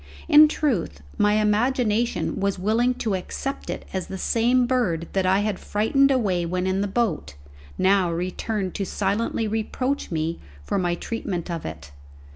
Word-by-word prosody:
In 305 +1 +8
truth, 190 - -1 0.2
my 205 0 +4
imagination 220 +2 +1
was 200 0 0
willing 225 +6 +1
to 220 -4 -2
accept 230 +8 -4
it - - -4
as 190 -2 -3
the 190 - -6
same 240 +5 +2
bird 205 -11 0
that 190 -1 +1
I 190 +2 +3
had 205 -2 -2
frightened 275 +7 +2
away 205 -10 +1
when 180 +2 -2
in 190 +1 0
the 205 - 0
boat, 195 - -1 0.4
now 190 -2 +3
returned 185 +3 -3
to 200 - -2
silently 210 +4 -1
reproach 255 +6 -2
me 165 0 -2 0.2
for 130 - -1
my 175 -1 0
treatment 180 -4 -4
of 165 -2 -4
it. 80 -3 -9
200 Hz, 160 wpm, -24 LUFS, 180-235 Hz, 0.4 s, In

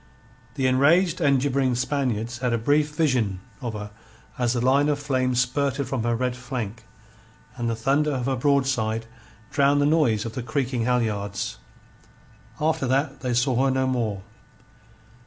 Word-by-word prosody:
The 135 - -1
enraged 155 +8 +3
and 140 -2 +4
gibbering 135 -2 +1
Spaniards 120 -3 -1
had 125 -2 0
a - - +2
brief 145 +6 +2
vision 125 - +1 0.2
of 120 -3 -4
her 105 0 -6 0.5
as 120 -1 +1
the 120 - -1
line 135 +4 +3
of 145 - +1
flame 130 -3 0
spurted 135 +2 0
from 130 -2 -2
her 120 +1 0
red 125 +1 -1
flank, 120 -3 -5 0.7
and 120 -2 -2
the 115 - -1
thunder 140 +7 +1
of 125 -2 -2
her 135 0 0
broadside 125 -5 +1 0.5
drowned 140 0 +3
the 145 - +3
noise 145 -9 +2
of 115 - -5
the 125 - -4
creaking 130 -3 -1
halyards. 105 -5 -1 1.0
After 155 -2 0
that 135 +1 0
they 125 -2 -2
saw 125 +1 +2
her - - +3
no 130 0 +1
more. 115 -7 -1
130 Hz, 160 wpm, -24 LUFS, 120-140 Hz, 1.0 s, and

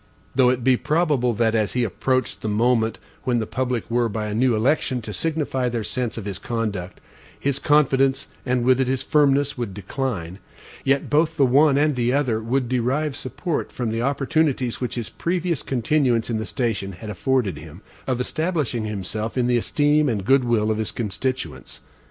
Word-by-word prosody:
Though 130 -1 +4
it 125 -1 0
be 130 0 +4
probable 150 -7 +1
that, 115 0 +2
as 110 -2 +1
he 125 - +1
approached 130 +4 -1
the - - -3
moment 115 +1 +2 0.2
when 125 -2 0
the 110 - 0
public 125 0 -2
were, 120 0 +1
by 110 0 -3
a 105 - -3
new 120 +2 +2
election, 130 +2 +1
to 105 - -6
signify 145 -5 -1
their 115 -2 -2
sense 120 +2 -3
of 110 - -5
his 100 -2 -5
conduct, 105 -5 -3 0.4
his 140 0 -1
confidence, 135 -3 +3 0.2
and 125 -1 0
with 130 +1 +4
it 130 - +1
his 130 0 0
firmness, 145 -2 +2
would 105 -6 -4
decline; 100 -4 -4 0.4
yet 135 +1 +1
both 160 +2 +2
the 140 - +5
one 140 +3 +4
and 150 0 +2
the 120 0 +1
other 130 -6 +1
would 125 +3 0
derive 130 +4 0
support 145 +5 -3
from 120 -3 -3
the 115 +1 -1
opportunities 140 -1 0
which 125 - -2
his 120 -3 -4
previous 170 -3 -1
continuance 125 -2 +1
in 110 - 0
the 110 - -4
station 100 -1 -2
had 105 +4 -7
afforded 105 - 0
him, 80 +5 -12 0.2
of 130 -2 0
establishing 150 -5 -1
himself 105 +3 -4
in 125 - +2
the 120 0 +3
esteem 145 +4 +2
and 105 -5 -2
good 135 +2 +4
will 110 -3 +1
of 110 - -1
his 110 -4 -1
constituents. 130 +4 -4
125 Hz, 185 wpm, -23 LUFS, 110-135 Hz, 0.4 s, the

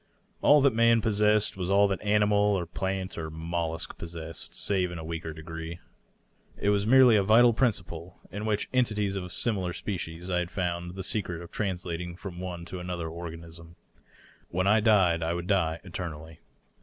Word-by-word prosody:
All 150 0 +6
that 135 -2 +4
man 115 0 +4
possessed 105 -1 +2
was 90 -1 -3
all 100 +1 +5
that 95 - -2
animal 105 0 +2 0.2
or 90 - -2
plant 95 +1 -3
or 80 -1 -4
mollusk 80 0 -4
possessed, 80 -1 -6
save 95 -3 0
in 85 - -7
a 80 - -6
weaker 80 0 -5
degree. 80 +1 -7 0.8
It 100 - +1
was 100 0 +1
merely 125 -2 +7
a - - +4
vital 115 +4 +6
principle, 90 -8 -1
which 105 +1 -2
in 130 - +4
en 125 - +5
tities 105 -3 -2
of 95 - -3
a - - -8
similar 95 -3 0
species 85 -3 -5
I 90 -1 +1
had 90 -1 -3
found 90 -1 -3
the 95 - -5
secret 90 -4 -2
of 85 - -12
translating 90 -3 -3
from 90 -1 -8
one 90 -2 -6
to 90 +2 -7
another 90 -2 -4
organism. 85 0 -9 0.7
When 95 +2 -1
I 110 +3 +5
died 95 -6 +4
I 85 +1 -1
would 85 0 -4
die 85 -4 +1
eternally. 80 -4 -7
90 Hz, 180 wpm, -28 LUFS, 85-105 Hz, 0.8 s, merely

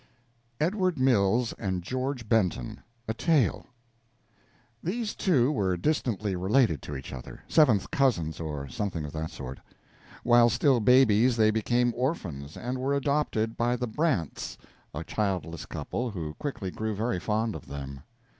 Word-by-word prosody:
EDWARD 185 +1 +1
MILLS 120 -2 +3
AND 95 -4 -2
GEORGE 130 +2 -3
BENTON: 95 - 0 0.3
A 110 - 0
TALE 150 +1 +1 1.1
These 215 +5 -2
two 145 -8 +2
were 95 -9 0
distantly 105 - 0
related 95 - +2
to 75 - -6
each 65 - -8
other 65 -2 -9
seventh 125 -11 +4
cousins, 85 - +1
or 75 -4 -4
something 85 +1 -3
of 75 - -6
that 80 0 -3
sort. 65 -5 -8 0.6
While 120 0 +6
still 125 +2 +3
babies 120 0 +5
they 110 -1 +5
became 120 +2 +1
orphans, 85 - -3
and 125 +2 -3
were 135 +2 0
adopted 140 -6 0
by 120 +1 +1
the 125 0 -2
Brants, 110 - -1 0.3
a - - -5
childless 90 -6 -2
couple, 125 +1 -3
who 80 -7 -5
quickly 100 - -4
grew 110 +1 -3
very 110 -1 -1
fond 110 +3 0
of - - -9
them. 70 -1 -7
110 Hz, 145 wpm, -28 LUFS, 90-130 Hz, 1.1 s, While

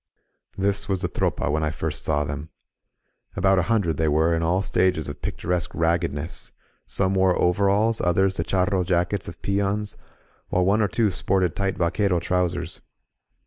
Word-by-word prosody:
This 100 +1 0
was 95 -2 0
the 90 - 0
Tropa 85 - -1
when 80 +1 0
I 75 - 0
first 80 - -4
saw 75 -1 +1
them. 75 +2 -5 0.9
About 95 +1 +3
a 90 - -2
hundred, 95 -10 +1
they 80 - +1
were, 80 +3 +3
in 80 - -1
all 90 +4 +1
stages 90 -5 +1
of 70 - -7
picturesque 90 -3 -2
rag^ 85 +1 +2
gedness; 80 -1 -4 0.3
some 95 +10 +1
wore 95 -1 +2
overalls, 100 +5 +2
others 95 +2 +2
the 80 - -1
charro 95 +1 +1
jackets 90 +2 0
of 85 - -9
peons, 100 +1 -1 0.5
while 90 0 +1
one 100 +3 +3
or 105 - +3
two 105 +2 +1
sported 90 -2 0
tight 95 -1 -1
vaquero 90 +1 +1
trou 90 +1 +1
sers. 85 0 -6
90 Hz, 175 wpm, -24 LUFS, 85-100 Hz, 0.9 s, About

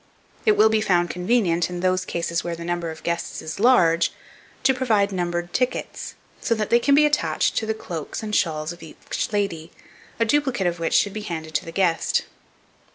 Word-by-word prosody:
It 430 - +7
will 220 - +6
be 220 0 +2
found 175 -4 +2
convenient, 180 -3 +1
in 175 -1 -5
those 185 0 +1
cases 170 -1 -2
where 170 -1 -3
the 170 0 -8
number 175 -1 -2
of 160 -1 -9
guests 170 0 -3
is 155 +4 -6
large, 175 -9 +4 0.5
to 265 - +5
provide 220 -6 +1
numbered 175 -1 -2
tickets, 250 0 -2 0.2
so 230 - 0
that 215 -1 -3
they 235 - +6
can 280 +3 +3
be 300 +1 +6
attached 295 0 +1
to 220 - 0
the 220 - 0
cloaks 170 -3 -6
and 210 -1 -2
shawls 155 -1 0
of 175 - -15
each 160 -2 -5
lady, 175 -6 -2 0.5
a 230 - +3
duplicate 265 -5 +1
of 175 -1 0
which 165 - 0
should 200 - +3
be 215 - -4
handed 160 -5 -6
to - - -1
the 165 - -7
guest. 170 -2 +1
180 Hz, 200 wpm, -23 LUFS, 170-220 Hz, 0.5 s, It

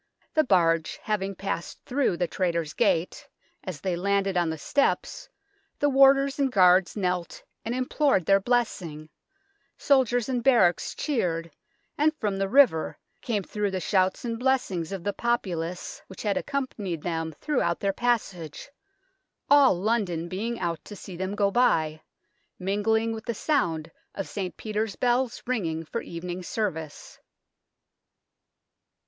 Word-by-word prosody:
The 310 - +4
barge 165 - +2
having 200 -2 -2
passed 195 -3 -5
through 255 -9 +1
the 175 - +1
Traitors' 170 -5 -1
Gate, 165 +2 0 0.3
as 180 -6 -6
they 185 -2 -1
landed 195 +1 0
on 175 -2 +2
the 160 - -3
steps 285 - 0 0.5
the 290 - +2
warders 275 +1 +5
and 275 -2 +2
guards 185 -1 +4
knelt 180 -3 -2 0.2
and 230 +2 -2
implored 255 - +1
their 195 +2 +5
blessing, 185 -9 -1 0.7
soldiers 245 -4 +2
in 250 -2 -1
barracks 230 -9 +3
cheered, 170 - -1 0.5
and 310 +1 +3
from 205 -8 -2
the 195 0 0
river 250 - +4 0.2
came 215 -5 -1
through 210 +2 -2
the 190 -1 -2
shouts 185 +3 +1
and 230 -1 -3
blessings 240 -11 0
of 195 -3 -5
the 205 - -1
populace 180 -7 -2
which 190 - -9
had 205 -2 +1
accompanied 215 - -3
them 165 -2 -2
58 - - -29
THE - - -23
TOWER 305 - -1
OF 255 - +3
LONDON - - +1
throughout 170 - -1
their 195 -1 +1
passage, 195 - -2 0.8
all 285 -7 +7
London 190 -6 0
being 220 +7 -3
out 170 -3 -2
to 205 - -9
see 190 -2 -9
them 190 +3 -3
go 200 -1 +2
by, 160 -10 +2 0.6
mingling 215 +4 +1
with 220 -1 -6
the 235 - -2
sound 165 - 0 0.2
of 195 - -4
St. 190 -3 -5
Peter's 215 -1 -2
bells 245 0 0
ringing 165 -10 -2
for 230 - -4
evening 175 +2 -6
service. 165 -6 -4
195 Hz, 150 wpm, -26 LUFS, 175-240 Hz, 0.8 s, all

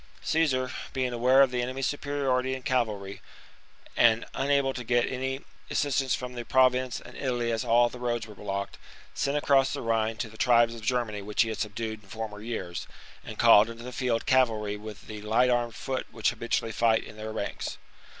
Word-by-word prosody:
Caesar, 135 -6 +1 0.2
being 130 -2 -1
aware 130 +3 +5
of 135 - +1
the 125 -1 0
enemy's 130 +2 -2
superiority 135 -3 0
in 130 - -8
cavalry, 105 -7 -1 0.7
and 115 -1 +4
unable 140 -1 +1
to 125 - -5
get 120 +1 +2
any 130 +1 -3 0.3
assistance 135 -3 +1
from 125 0 -6
the 120 -1 -5
Province 130 0 +2
and - - -13
Italy 120 -3 -1
as 115 -1 -1
all 120 +1 +4
the 125 +1 -9
roads 120 -2 -1
were 110 - -11
blocked, 100 0 -5 0.3
sent 140 +1 0
across 135 -2 +3
the - - -3
Rhine 115 -1 0
to 115 - -3
the 110 0 -14
tribes 120 -1 +4
of 115 - -9
Germany 110 -3 -1
which 105 +3 +1
he 115 - -4
had 110 - -4
subdued 110 +1 -4
in 100 - -21
former 110 -1 -6
years, 100 -6 -5 0.4
and - - -8
called 105 +2 +7
into 115 0 -9
the 125 - -7
field 120 -2 -1
cavalry 110 -5 +2
with 105 0 -9
the 105 -1 -8
light 115 +4 +3
armed 120 -1 0
foot 130 -1 -3
which 115 +2 0
habitually 115 -1 -2
fight 110 0 +2
in - - -11
their 110 0 -6
rank's. 110 -2 -4
120 Hz, 195 wpm, -28 LUFS, 110-130 Hz, 0.7 s, called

